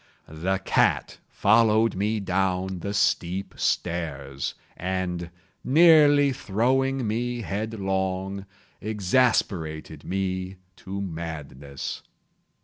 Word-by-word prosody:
The 85 Hz, +5 st, -1 dB
cat -, -, +1 dB
followed 110 Hz, +1 st, +4 dB
me 105 Hz, +3 st, 0 dB
down 95 Hz, -1 st, -1 dB
the 100 Hz, -, -4 dB
steep 95 Hz, -2 st, 0 dB
stairs, 70 Hz, -6 st, -2 dB, 0.2 s
and, 90 Hz, -1 st, -3 dB, 0.3 s
nearly 145 Hz, -2 st, +6 dB
throwing 130 Hz, +4 st, 0 dB
me 120 Hz, +2 st, -2 dB
headlong, 95 Hz, -2 st, -2 dB, 0.3 s
exasperated 95 Hz, -, 0 dB
me 95 Hz, 0 st, -2 dB, 0.2 s
to 100 Hz, +1 st, -6 dB
madness. 75 Hz, -6 st, -6 dB
95 Hz, 80 wpm, -25 LUFS, 90-110 Hz, 0.3 s, nearly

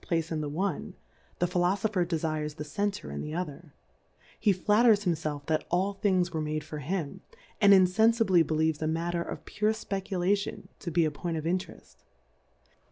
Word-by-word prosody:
23 -, -, -18 dB
Place 165 Hz, 0 st, -3 dB
in 155 Hz, -1 st, -1 dB
the 150 Hz, -, -3 dB
one, 185 Hz, +6 st, -3 dB, 0.4 s
the 175 Hz, -, +1 dB
Philofopher 185 Hz, +3 st, +1 dB
defires 155 Hz, -3 st, -2 dB
the 150 Hz, -, -5 dB
Center 155 Hz, -, -3 dB
in 70 Hz, -, -4 dB
the 155 Hz, -, -5 dB
other; 170 Hz, -2 st, -5 dB, 0.7 s
he 210 Hz, -, +4 dB
flitters 210 Hz, +2 st, +4 dB
himlclf 155 Hz, -4 st, -2 dB
that 155 Hz, 0 st, 0 dB
all 190 Hz, +3 st, +1 dB
Tilings 185 Hz, -3 st, +1 dB
were 160 Hz, -, -1 dB
made 155 Hz, 0 st, -2 dB
for 150 Hz, 0 st, -7 dB
him, 155 Hz, +1 st, -3 dB, 0.4 s
and 200 Hz, -1 st, +7 dB
iafenfibly 195 Hz, 0 st, +5 dB
beUeves 160 Hz, -1 st, 0 dB
a -, -, 0 dB
Alatter 170 Hz, +2 st, -1 dB
of -, -, -7 dB
pure 215 Hz, +1 st, 0 dB
Speculation 195 Hz, -2 st, -2 dB
to 175 Hz, -, -5 dB
be 170 Hz, 0 st, +2 dB
a 155 Hz, -, 0 dB
Point 165 Hz, +2 st, -4 dB
of 155 Hz, -, -4 dB
Intereli. 180 Hz, +2 st, -4 dB
175 Hz, 170 wpm, -29 LUFS, 155-195 Hz, 0.7 s, and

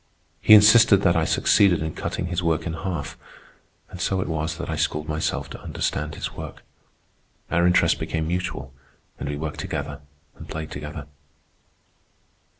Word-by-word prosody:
He 110 Hz, -, +8 dB
insisted 105 Hz, -1 st, +7 dB
that 85 Hz, -2 st, +4 dB
I 80 Hz, -1 st, +2 dB
succeeded 90 Hz, -2 st, +3 dB
in 80 Hz, -, -4 dB
cutting 90 Hz, -, -4 dB
his 90 Hz, 0 st, -2 dB
work 80 Hz, -2 st, 0 dB
in 85 Hz, -, -3 dB
half; 85 Hz, -3 st, -5 dB, 0.7 s
and 90 Hz, -, -8 dB
so 95 Hz, 0 st, 0 dB
it -, -, -2 dB
was 80 Hz, 0 st, -2 dB
that 90 Hz, -, -5 dB
I 80 Hz, -, -2 dB
schooled 75 Hz, 0 st, -1 dB
myself 75 Hz, 0 st, -2 dB
to -, -, -9 dB
understand 75 Hz, +2 st, -3 dB
his -, -, -4 dB
work. -, -, -9 dB, 0.9 s
Our 85 Hz, 0 st, +3 dB
interests 90 Hz, -, +3 dB
became 80 Hz, -1 st, -2 dB
mutual, 90 Hz, -7 st, -3 dB, 0.5 s
and 70 Hz, -, -4 dB
we 70 Hz, -, -3 dB
worked 75 Hz, 0 st, -5 dB
together -, -, -4 dB, 0.3 s
and -, -, -12 dB
played 80 Hz, 0 st, -6 dB
together. 75 Hz, +1 st, -7 dB
80 Hz, 160 wpm, -24 LUFS, 75-90 Hz, 0.9 s, He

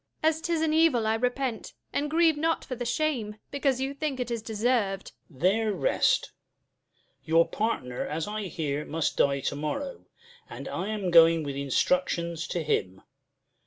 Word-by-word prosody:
Jul. 315 Hz, -, +6 dB
As 320 Hz, 0 st, -3 dB
'tis 335 Hz, -1 st, 0 dB
an 310 Hz, -1 st, +1 dB
evil 310 Hz, -8 st, +4 dB
I 220 Hz, -, +2 dB
repent, 245 Hz, +1 st, -2 dB, 0.2 s
and 295 Hz, +1 st, 0 dB
grieve 325 Hz, 0 st, +4 dB
not 325 Hz, +2 st, 0 dB
for -, -, -5 dB
The 245 Hz, 0 st, -4 dB
shame, 240 Hz, -5 st, -1 dB, 0.2 s
because 275 Hz, -2 st, +1 dB
you 270 Hz, +1 st, -2 dB
think 280 Hz, -2 st, -3 dB
it 245 Hz, -1 st, -3 dB
is 230 Hz, -1 st, -2 dB
deserv'd. 215 Hz, -3 st, -1 dB, 0.2 s
Duke. 135 Hz, -6 st, -18 dB
There 215 Hz, +5 st, +3 dB
rest. -, -, +1 dB, 0.9 s
Your 165 Hz, +1 st, +4 dB
partner, 130 Hz, -, -2 dB
as 155 Hz, +3 st, -3 dB
I 210 Hz, 0 st, -3 dB
hear, 150 Hz, -4 st, -3 dB
must 160 Hz, +1 st, -1 dB
die 140 Hz, -1 st, +2 dB
to 140 Hz, -, -2 dB
morrow; 265 Hz, -, -4 dB, 0.4 s
And -, -, -8 dB
I 190 Hz, -, -3 dB
am 205 Hz, -4 st, -2 dB
going 165 Hz, -1 st, +7 dB
with 140 Hz, -2 st, -4 dB
instructions 170 Hz, +4 st, 0 dB
to 170 Hz, -, -2 dB
him. 95 Hz, -10 st, -1 dB
215 Hz, 170 wpm, -27 LUFS, 165-275 Hz, 0.9 s, going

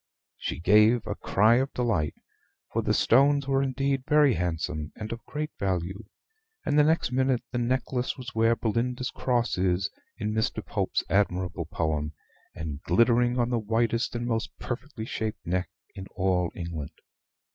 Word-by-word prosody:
She -, -, -3 dB
gave 105 Hz, +6 st, +5 dB
a -, -, -2 dB
cry 110 Hz, +4 st, +3 dB
of 135 Hz, +2 st, 0 dB
delight, 115 Hz, -, 0 dB, 0.6 s
for -, -, +1 dB
the -, -, 0 dB
stones 140 Hz, +3 st, +4 dB
were 135 Hz, 0 st, +2 dB
indeed 135 Hz, 0 st, 0 dB
very 150 Hz, -3 st, +5 dB
handsome, 80 Hz, -3 st, -2 dB
and 110 Hz, 0 st, -6 dB
of 115 Hz, 0 st, -6 dB
great 150 Hz, +1 st, -4 dB
value; 95 Hz, +2 st, -2 dB, 0.6 s
and 145 Hz, -, +3 dB
the -, -, +7 dB
next 160 Hz, -3 st, +2 dB
minute 130 Hz, -1 st, +1 dB
the 120 Hz, -, -1 dB
necklace 125 Hz, +1 st, -1 dB
was 130 Hz, +1 st, -7 dB
where 115 Hz, +1 st, +3 dB
Belinda's 125 Hz, +3 st, -1 dB
cross 120 Hz, -6 st, 0 dB
is 95 Hz, +1 st, +1 dB, 0.3 s
in 105 Hz, 0 st, -2 dB
Mr. 110 Hz, 0 st, -1 dB
Pope's -, -, -1 dB
admirable 90 Hz, -4 st, 0 dB
poem, 75 Hz, -2 st, -1 dB, 0.4 s
and 75 Hz, -2 st, -5 dB
glittering 120 Hz, +3 st, +3 dB
on 120 Hz, 0 st, +1 dB
the 120 Hz, -, +2 dB
whitest 115 Hz, +3 st, 0 dB
and 120 Hz, 0 st, -2 dB
most 115 Hz, -2 st, -1 dB
perfectly 120 Hz, -2 st, -5 dB
shaped 110 Hz, -1 st, -4 dB
neck 90 Hz, +2 st, -1 dB, 0.2 s
in 95 Hz, -1 st, -8 dB
all 90 Hz, -2 st, +1 dB
England. 85 Hz, -4 st, -5 dB
115 Hz, 155 wpm, -27 LUFS, 95-125 Hz, 0.6 s, the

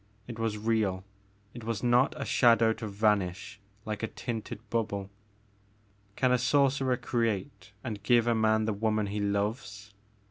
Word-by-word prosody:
It 115 Hz, -2 st, -8 dB
was 110 Hz, -2 st, -1 dB
real, 105 Hz, -4 st, 0 dB, 0.5 s
it 120 Hz, -, -9 dB
was 115 Hz, -1 st, -3 dB
not 120 Hz, +2 st, +3 dB
a -, -, -3 dB
shadow 115 Hz, -2 st, +4 dB
to 110 Hz, 0 st, -6 dB
vanish 105 Hz, 0 st, 0 dB, 0.3 s
like 110 Hz, -1 st, -4 dB
a 110 Hz, -, -1 dB
tinted 115 Hz, -1 st, -6 dB
bubble 100 Hz, -4 st, -2 dB
I -, -, -32 dB, 1.0 s
Can 130 Hz, -1 st, +2 dB
a 125 Hz, -, +3 dB
sorcerer 135 Hz, 0 st, +2 dB
create 105 Hz, -6 st, -2 dB
and 110 Hz, -5 st, -5 dB
give 120 Hz, +3 st, +3 dB
a 120 Hz, -, +2 dB
man 110 Hz, -1 st, +2 dB
the 110 Hz, -, 0 dB
woman 110 Hz, 0 st, 0 dB
he 105 Hz, +1 st, -3 dB
loves 100 Hz, 0 st, -3 dB
110 Hz, 155 wpm, -29 LUFS, 105-120 Hz, 1.0 s, shadow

